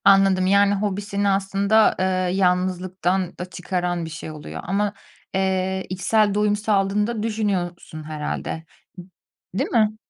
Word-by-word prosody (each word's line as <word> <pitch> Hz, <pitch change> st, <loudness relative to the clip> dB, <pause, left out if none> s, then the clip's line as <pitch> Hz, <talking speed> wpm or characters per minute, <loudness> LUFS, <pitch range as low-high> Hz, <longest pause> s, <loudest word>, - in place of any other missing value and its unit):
Anladım. 195 Hz, -1 st, +5 dB
Yani, 200 Hz, +1 st, +4 dB
hobisini 200 Hz, 0 st, -1 dB
aslında, 200 Hz, +2 st, +3 dB
eee, 185 Hz, -, +1 dB, 0.3 s
yalnızlıktan 185 Hz, 0 st, 0 dB
da 180 Hz, -, -3 dB
çıkaran 175 Hz, -1 st, -2 dB
bir 160 Hz, -, -6 dB
şey 155 Hz, +1 st, -7 dB
oluyor 150 Hz, -1 st, -7 dB
ama, 200 Hz, +3 st, 0 dB, 0.4 s
eee, 190 Hz, 0 st, 0 dB
içsel 205 Hz, +3 st, +2 dB
doyum 210 Hz, 0 st, +2 dB
sağladığını 205 Hz, -1 st, +1 dB
da 230 Hz, -3 st, -3 dB
düşünüyorsun 190 Hz, -7 st, -2 dB
herhâlde, 155 Hz, +1 st, -4 dB, 0.9 s
değil -, -, -1 dB
mi? 215 Hz, -2 st, +2 dB
195 Hz, 125 wpm, -23 LUFS, 180-205 Hz, 0.9 s, Anladım